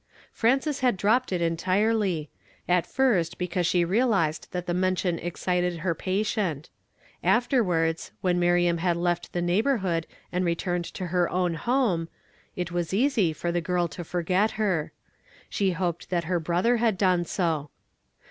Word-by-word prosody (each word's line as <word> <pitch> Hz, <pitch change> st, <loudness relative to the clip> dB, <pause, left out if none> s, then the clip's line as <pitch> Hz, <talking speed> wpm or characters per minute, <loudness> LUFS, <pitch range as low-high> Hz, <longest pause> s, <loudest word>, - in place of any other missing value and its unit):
Frances 270 Hz, +5 st, +1 dB
had 250 Hz, -6 st, +2 dB
dropped 225 Hz, +6 st, +2 dB
it 175 Hz, -2 st, 0 dB
entirely; 185 Hz, 0 st, 0 dB, 0.4 s
at 180 Hz, -1 st, +2 dB
first 220 Hz, -12 st, +1 dB
because 180 Hz, -1 st, -1 dB
she 175 Hz, -1 st, +2 dB
realizcnl 195 Hz, -6 st, +1 dB
that 180 Hz, -1 st, -4 dB
the 175 Hz, -, -1 dB
mention 180 Hz, -1 st, 0 dB
excited 175 Hz, 0 st, -1 dB
her 170 Hz, +1 st, -1 dB
patient; 185 Hz, -4 st, -2 dB, 0.5 s
afterwards, 180 Hz, -10 st, +1 dB
when 180 Hz, -1 st, +1 dB
Miriam 175 Hz, -1 st, +2 dB
had 175 Hz, 0 st, +1 dB
left 175 Hz, 0 st, -1 dB
the 175 Hz, -, -2 dB
neighborhood 185 Hz, -, +1 dB, 0.2 s
and 180 Hz, +1 st, 0 dB
returned 175 Hz, 0 st, -1 dB
to 185 Hz, -, -6 dB
her 175 Hz, 0 st, +1 dB
own 180 Hz, -1 st, 0 dB
home, 185 Hz, -3 st, 0 dB, 0.5 s
it 175 Hz, -1 st, -3 dB
was 175 Hz, +1 st, -2 dB
easy 230 Hz, -, +2 dB
for 170 Hz, +3 st, -3 dB
the 175 Hz, 0 st, 0 dB
girl 175 Hz, 0 st, 0 dB
to 175 Hz, -, -7 dB
forget 180 Hz, +5 st, +1 dB
her; 190 Hz, -8 st, 0 dB, 0.6 s
she 195 Hz, -2 st, +1 dB
hoped 175 Hz, -1 st, -3 dB
that 175 Hz, -2 st, 0 dB
her 175 Hz, +1 st, 0 dB
brother 175 Hz, +9 st, +1 dB
had 225 Hz, -4 st, +1 dB
done 180 Hz, -3 st, +2 dB
so. 160 Hz, -4 st, -1 dB
180 Hz, 150 wpm, -26 LUFS, 170-200 Hz, 0.6 s, had